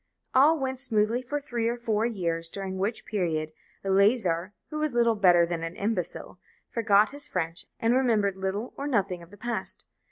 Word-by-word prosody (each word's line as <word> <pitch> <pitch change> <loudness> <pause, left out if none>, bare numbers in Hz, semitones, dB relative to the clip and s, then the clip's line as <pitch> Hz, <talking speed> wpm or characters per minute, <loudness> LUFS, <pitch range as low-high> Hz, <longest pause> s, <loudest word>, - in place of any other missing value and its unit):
All 290 +5 +6
went 265 -2 -3
smoothly 230 -2 +1
for 275 +4 -3
three 240 -5 -2
or 240 +1 -1
four 225 -2 0
years, 170 -7 -1
during 190 0 -5
which 205 +4 -2
period 160 -6 -1 0.3
Eleazar, 195 -3 +2 0.2
who 305 - -3
was 305 -5 -1
little 235 -1 +4
better 180 -5 +5
than 170 -1 -3
an 165 +1 -5
imbecile, 195 -3 -3 0.3
forgot 215 -1 +3
his 285 +1 -5
French, 165 -1 -2
and 230 +1 +2
remembered 225 -7 +2
little 190 +5 -3
or 280 - -3
nothing 195 -9 0
of 170 - -13
the 205 - -14
past. 240 +2 -4
210 Hz, 180 wpm, -27 LUFS, 185-240 Hz, 0.3 s, All